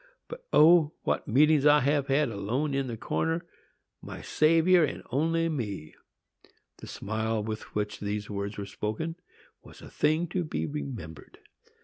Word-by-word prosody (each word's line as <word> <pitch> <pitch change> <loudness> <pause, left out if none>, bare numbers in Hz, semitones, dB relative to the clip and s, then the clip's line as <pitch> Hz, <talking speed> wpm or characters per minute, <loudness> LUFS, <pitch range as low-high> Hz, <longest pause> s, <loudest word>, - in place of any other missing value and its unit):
But, - - -10
O! 160 -1 +6
what - - -1
meetings 150 +4 +4
I 150 0 +6
have 140 +1 +1
had, 140 0 +2
alone 115 +8 -2
in 135 -1 -1
the 115 -2 -5
corner,—my 165 +8 -5
Saviour 165 +3 +4
and 150 - -2
only 165 +5 +1
me!" 105 - -4 0.8
The - - -11
smile 110 +1 -2
with 110 0 -6
which 105 0 -2
these 105 0 -3
words 100 0 -4
were 100 - -4
spoken 110 +12 -4 0.5
was - - -15
a - - -12
thing 155 +3 +1
to 180 0 -1
be 155 - -3
remembered. 115 - -7
140 Hz, 145 wpm, -28 LUFS, 105-160 Hz, 0.8 s, O